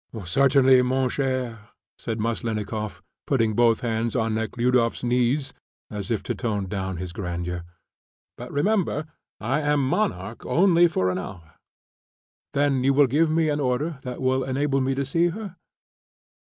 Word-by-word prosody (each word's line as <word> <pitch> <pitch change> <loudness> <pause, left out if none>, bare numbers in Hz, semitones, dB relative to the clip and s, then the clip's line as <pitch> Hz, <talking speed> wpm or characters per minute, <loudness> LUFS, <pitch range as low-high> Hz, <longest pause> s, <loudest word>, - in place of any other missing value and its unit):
"Certainly, 130 +6 +5
mon 130 +1 +1
cher," 125 -6 -2 0.3
said 110 0 -4
Maslennikoff, 110 -1 -3 0.2
putting 115 -5 +2
both 115 0 +3
hands 115 -1 -1
on 115 -2 +1
Nekhludoff's 115 +2 0
knees, 125 +3 +1 0.4
as 105 -3 -5
if 110 -4 -1
to - - -2
tone 105 -5 -2
down 95 -2 -3
his 90 0 -6
grandeur; 90 -2 -4 0.7
"but 125 +1 -9
remember, 165 0 0 0.3
I 130 +7 0
am 145 -3 +1
monarch 210 +9 -1
only 175 -1 +4
for 95 - 0
an 90 - -2
hour." 85 -4 -9 1.0
"Then 140 -2 +2
will 135 +2 +3
you - - +3
give 155 +5 +3
me 160 0 +2
an 150 0 0
order 140 +3 -1
that 125 -2 -6
will 130 0 +2
enable 135 +1 0
me 135 +1 0
to 140 +1 -1
see 165 +6 +2
her?" 195 +1 -6
125 Hz, 150 wpm, -24 LUFS, 110-145 Hz, 1.0 s, Certainly